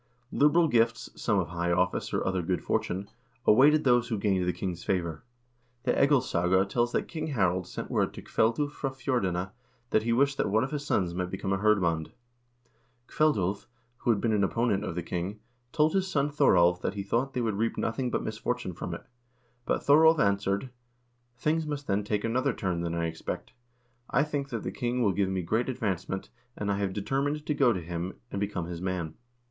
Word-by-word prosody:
1 -, -, -5 dB
Liberal 165 Hz, +4 st, +5 dB
gifts, 115 Hz, -3 st, +1 dB
some 100 Hz, -5 st, 0 dB
high 85 Hz, +1 st, -2 dB
office 90 Hz, +1 st, 0 dB
or -, -, -1 dB
other 95 Hz, -1 st, 0 dB
good 90 Hz, +2 st, -2 dB
fortune, 95 Hz, +3 st, -1 dB, 0.4 s
awaited 145 Hz, +7 st, +6 dB
those 120 Hz, -2 st, +3 dB
who 115 Hz, -3 st, -1 dB
gained 100 Hz, -2 st, +1 dB
the -, -, +3 dB
king's 90 Hz, -2 st, -4 dB
favor. 85 Hz, -5 st, -2 dB, 0.6 s
The -, -, +2 dB
"Egilssaga" 95 Hz, -, +3 dB
tells 120 Hz, +3 st, 0 dB
that -, -, 0 dB
King 155 Hz, -1 st, -4 dB
Harald 95 Hz, -, 0 dB
sent -, -, -6 dB
word -, -, +1 dB
to -, -, -8 dB
Kveldulv 120 Hz, +6 st, +1 dB
fra 140 Hz, -2 st, -3 dB
Fjordene 100 Hz, -9 st, -1 dB, 0.4 s
that 110 Hz, -, +4 dB
he 115 Hz, +2 st, -1 dB
wished 135 Hz, +3 st, +2 dB
that -, -, 0 dB
one 110 Hz, +3 st, +3 dB
of 135 Hz, -, -3 dB
his 145 Hz, -1 st, -3 dB
sons 90 Hz, -, 0 dB
might 90 Hz, 0 st, -2 dB
become 95 Hz, +1 st, -2 dB
a 95 Hz, -, 0 dB
hirdmand. 90 Hz, -7 st, +2 dB, 1.0 s
Kveldulv, 105 Hz, -, +1 dB, 0.3 s
who -, -, -3 dB
had 110 Hz, -3 st, +4 dB
been 115 Hz, 0 st, +1 dB
an 100 Hz, -2 st, +2 dB
opponent 105 Hz, -1 st, +1 dB
of 90 Hz, -, -4 dB
the 90 Hz, -, -2 dB
king, 90 Hz, +5 st, -4 dB, 0.3 s
told 155 Hz, +1 st, +2 dB
his 190 Hz, -1 st, +1 dB
son 145 Hz, -5 st, 0 dB
Thoralv 90 Hz, -11 st, +4 dB
that 100 Hz, -, -2 dB
he 100 Hz, -, -3 dB
thought 120 Hz, +7 st, -1 dB
they 125 Hz, -, 0 dB
would 110 Hz, -3 st, -1 dB
reap 115 Hz, +1 st, 0 dB
nothing 125 Hz, +3 st, -1 dB
but -, -, -1 dB
misfortune 110 Hz, -1 st, -3 dB
from 85 Hz, 0 st, -5 dB
it. -, -, -11 dB, 0.6 s
But -, -, 0 dB
Thoralv 160 Hz, +3 st, +6 dB
answered: 100 Hz, -1 st, +1 dB, 0.7 s
"Things 155 Hz, +4 st, 0 dB
must 145 Hz, -1 st, -4 dB
then 100 Hz, +1 st, 0 dB
take 105 Hz, 0 st, -1 dB
another 125 Hz, +3 st, +1 dB
turn 90 Hz, -5 st, -2 dB
than 85 Hz, 0 st, -2 dB
I 85 Hz, 0 st, 0 dB
expect. 80 Hz, -1 st, -5 dB, 0.6 s
I 135 Hz, -, +3 dB
think 145 Hz, -2 st, -3 dB
that -, -, -4 dB
the -, -, -3 dB
king 125 Hz, -1 st, -1 dB
will 100 Hz, -3 st, +3 dB
give 100 Hz, -1 st, +1 dB
me 95 Hz, -1 st, -1 dB
great 110 Hz, +9 st, 0 dB
advancement, 95 Hz, -6 st, -3 dB, 0.3 s
and 100 Hz, -1 st, -1 dB
I 100 Hz, -, -1 dB
have 100 Hz, -2 st, 0 dB
determined 140 Hz, +9 st, -1 dB
to 150 Hz, -, 0 dB
go 140 Hz, -4 st, +4 dB
to 90 Hz, -5 st, -2 dB
him 85 Hz, +2 st, -4 dB, 0.2 s
and 100 Hz, -, -3 dB
become 100 Hz, -4 st, -2 dB
his 85 Hz, 0 st, -6 dB
man. 90 Hz, -4 st, -2 dB
105 Hz, 200 wpm, -28 LUFS, 95-130 Hz, 1.0 s, awaited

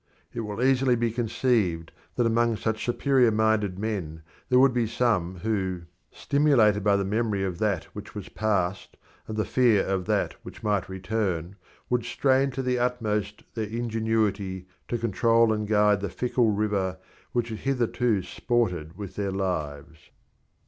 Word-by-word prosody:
It -, -, -4 dB
will 105 Hz, +1 st, -3 dB
easily 130 Hz, -1 st, +3 dB
be 115 Hz, -1 st, 0 dB
conceived 110 Hz, -7 st, 0 dB, 0.2 s
that 120 Hz, -, +2 dB
among 115 Hz, 0 st, +2 dB
such 110 Hz, +1 st, -2 dB
superior 125 Hz, 0 st, +3 dB
minded 110 Hz, -3 st, +1 dB
men 95 Hz, -7 st, -4 dB, 0.3 s
there 125 Hz, -, +4 dB
would 130 Hz, 0 st, +5 dB
be 120 Hz, -2 st, +1 dB
some 105 Hz, -6 st, 0 dB
who, 95 Hz, -5 st, -1 dB, 0.3 s
stimulated 130 Hz, -9 st, +3 dB
by 100 Hz, -1 st, +4 dB
the 100 Hz, 0 st, 0 dB
memory 105 Hz, -1 st, 0 dB
of 90 Hz, -3 st, -3 dB
that 100 Hz, -6 st, 0 dB
which 105 Hz, 0 st, -9 dB
was 100 Hz, -2 st, -6 dB
past 100 Hz, -3 st, -1 dB, 0.3 s
and 110 Hz, -, -5 dB
by 110 Hz, -, +2 dB
the -, -, -9 dB
fear 120 Hz, -6 st, +3 dB
of 95 Hz, -2 st, -1 dB
that -, -, 0 dB
which -, -, -11 dB
might 105 Hz, -3 st, 0 dB
return, 95 Hz, -2 st, -2 dB, 0.3 s
would 125 Hz, -1 st, 0 dB
strain 135 Hz, +3 st, +2 dB
to 135 Hz, 0 st, -4 dB
the 125 Hz, -1 st, 0 dB
utmost 115 Hz, -4 st, -1 dB
their 110 Hz, -2 st, -3 dB
ingenuity 110 Hz, -5 st, -1 dB, 0.2 s
to 120 Hz, -, -1 dB
control 115 Hz, +1 st, +3 dB
and 105 Hz, -1 st, -2 dB
guide 105 Hz, -1 st, +3 dB
the 100 Hz, -, -2 dB
fickle 125 Hz, -2 st, +1 dB
river 100 Hz, -3 st, 0 dB, 0.3 s
which 120 Hz, -1 st, -1 dB
had 110 Hz, -2 st, -5 dB
hitherto 120 Hz, -5 st, 0 dB
sported 90 Hz, -11 st, -1 dB
with 100 Hz, -3 st, -7 dB
their 100 Hz, -1 st, -2 dB
lives. 80 Hz, -4 st, -4 dB
110 Hz, 160 wpm, -26 LUFS, 95-120 Hz, 0.3 s, would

